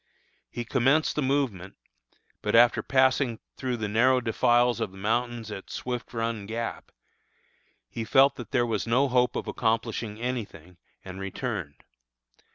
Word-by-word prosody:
He 120 Hz, -, -5 dB
commenced 135 Hz, +6 st, +2 dB
the 150 Hz, -, 0 dB
movement; 130 Hz, -9 st, -1 dB, 0.7 s
but -, -, 0 dB
after 120 Hz, +1 st, +6 dB
passing 130 Hz, -2 st, +2 dB, 0.2 s
through 130 Hz, -2 st, -3 dB
the 110 Hz, -2 st, -3 dB
narrow 125 Hz, +5 st, +3 dB
defiles 120 Hz, +1 st, +2 dB
of 110 Hz, -4 st, -2 dB
the 95 Hz, -, -14 dB
mountains 115 Hz, +2 st, -2 dB
at 95 Hz, -, -8 dB
Swift 125 Hz, -1 st, -5 dB
Run 115 Hz, -3 st, -3 dB
Gap, 115 Hz, +1 st, -5 dB, 1.0 s
he 115 Hz, -, -5 dB
felt 135 Hz, +4 st, +4 dB
that 120 Hz, -4 st, -8 dB
there 120 Hz, -1 st, +2 dB
was 115 Hz, -1 st, -2 dB
no 130 Hz, +4 st, +3 dB
hope 125 Hz, 0 st, +2 dB
of -, -, -3 dB
accomplishing 115 Hz, -1 st, -1 dB
any 125 Hz, 0 st, -2 dB
thing, 90 Hz, -3 st, -16 dB, 0.3 s
and 95 Hz, 0 st, -8 dB
returned. 95 Hz, -, -5 dB
120 Hz, 150 wpm, -27 LUFS, 110-125 Hz, 1.0 s, after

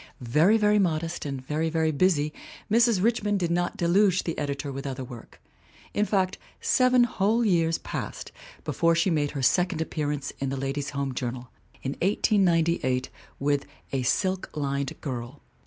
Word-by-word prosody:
Very, 150 Hz, -, +3 dB
very 210 Hz, -1 st, +3 dB
modest, 165 Hz, -4 st, -1 dB
and 135 Hz, -2 st, -5 dB
very, 155 Hz, +3 st, -1 dB
very 160 Hz, -1 st, +1 dB
busy, 155 Hz, -2 st, +2 dB, 0.4 s
Mrs. 230 Hz, -4 st, +4 dB
Rich 230 Hz, +1 st, +2 dB
mond 205 Hz, -1 st, +1 dB
did 170 Hz, -2 st, -1 dB
not 175 Hz, +1 st, 0 dB
deluge 185 Hz, +2 st, +3 dB
the 165 Hz, -, -3 dB
editor 145 Hz, 0 st, -3 dB
with 135 Hz, +1 st, -5 dB
other 130 Hz, -1 st, -4 dB
work. 120 Hz, -2 st, -11 dB, 0.5 s
In 210 Hz, -, +2 dB
fact, 190 Hz, -3 st, 0 dB, 0.2 s
seven 255 Hz, -1 st, +4 dB
whole 225 Hz, 0 st, +1 dB
years 165 Hz, -4 st, +2 dB
passed -, -, -6 dB, 0.3 s
before 165 Hz, 0 st, +2 dB
she 170 Hz, +3 st, +2 dB
made 150 Hz, -3 st, +1 dB
her 135 Hz, -, -2 dB
second 180 Hz, +5 st, +2 dB
appearance 150 Hz, -3 st, -2 dB
in 135 Hz, -, -1 dB
the 135 Hz, -, -3 dB
Ladies' 135 Hz, +1 st, -2 dB
Home 140 Hz, -2 st, -3 dB
Journal, 125 Hz, 0 st, -5 dB, 0.3 s
in 135 Hz, -, -2 dB
1898, 170 Hz, -, +2 dB, 0.3 s
with 145 Hz, 0 st, 0 dB, 0.3 s
A 135 Hz, -, +1 dB
Silk 185 Hz, +9 st, 0 dB
Lined 140 Hz, -1 st, -2 dB
Girl. 130 Hz, 0 st, -6 dB
160 Hz, 160 wpm, -26 LUFS, 140-190 Hz, 0.5 s, Mrs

